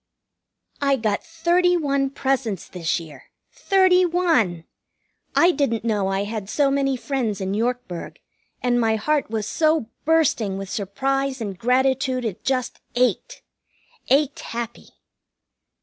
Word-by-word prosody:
I 280 -1 +3
got 215 -5 -1
thirty 345 +2 +2
one 280 -3 0
presents 265 -8 -1
this 175 -2 -2
year. 150 -5 -12 0.3
Thirty 375 -2 +3
one! 325 - +1 0.7
I 345 +1 +6
didn't 255 -9 0
know 210 -4 +1
I 195 +1 0
had 205 -1 -5
so 280 +1 +2
many 275 -1 +1
friends 245 -6 -2
in 190 0 -2
Yorkburg, 230 -5 -3 0.4
and 245 -1 +2
my 225 -1 +2
heart 295 +6 0
was 220 -2 -2
so 310 -1 +1
bursting 270 -11 +2
with 195 -1 -6
surprise 270 +7 -1
and 205 -4 -4
gratitude 255 +3 +1
it 210 -5 -4
just 255 -2 -1 0.2
ached. 255 - 0 0.7
Ached 280 +1 +2
happy. 235 0 -6
250 Hz, 130 wpm, -23 LUFS, 210-285 Hz, 0.7 s, I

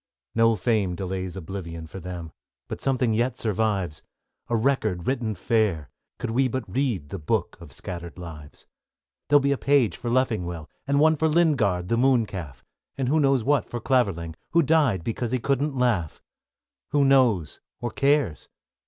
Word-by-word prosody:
No 115 0 +4
fame 100 -3 0
delays 95 0 -4
oblivion 85 -2 -6
For 85 +4 -9
them, 90 -2 -7 0.4
but - - -6
something 125 -4 +1
yet 120 +4 0
survives: 100 -7 -1 0.5
A 120 - +1
record 110 -8 0
written 120 -5 -1
fair, 95 - 0 0.3
could - - -4
we 130 +3 +2
But 130 0 -3
read 120 - -1
the 100 - -5
book 75 - -1
of 85 -4 -11
scattered 85 -1 -7
lives. 80 -4 -10 0.6
There'll 145 0 +6
be 140 +1 +1
a 140 - 0
page 135 - +3
for 120 - -5
Leffingwell, 90 -10 -1 0.2
And 140 +1 +2
one 155 +1 +5
for 160 - +2
Lingard, 135 - +2
the 115 - +2
Moon 125 -2 +4
calf; 80 -11 -8 0.3
And 130 -2 0
who 155 +3 +3
knows 135 -4 +3
what 145 +1 +1
for 120 - -4
Clavering, 100 -11 0 0.2
Who 170 0 +5
died 140 - +2
because 115 +3 -2
he - - +3
couldn't 140 +2 0
laugh? 110 -11 0 0.7
Who 145 -1 +3
knows 125 - +3 0.2
or 120 -1 -3
cares? 140 - +1
115 Hz, 165 wpm, -25 LUFS, 90-135 Hz, 0.7 s, There'll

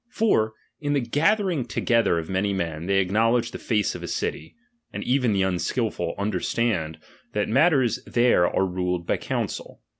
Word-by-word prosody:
For, 110 - +1 0.3
in 145 -1 -1
the 145 - +2
gathering 165 - +1
toge 115 0 +1
ther 85 - +2
of 80 -1 -3
many 95 +2 0
men, 85 -3 -3
they 100 0 +2
acknowledge 115 +5 +2
the - - -7
Tace 105 -5 0
of - - -7
a - - -5
city; 80 - -4 0.4
and - - -5
even 125 -2 +2
the 100 -2 +2
unakilfiil 95 -2 -1
understand, 100 -5 -1 0.4
that 105 0 0
matters 130 -2 +3
there 120 -7 +3
are 95 - +1
ruled 90 -1 -2
by - - 0
council. - - -4
110 Hz, 170 wpm, -24 LUFS, 95-125 Hz, 0.4 s, matters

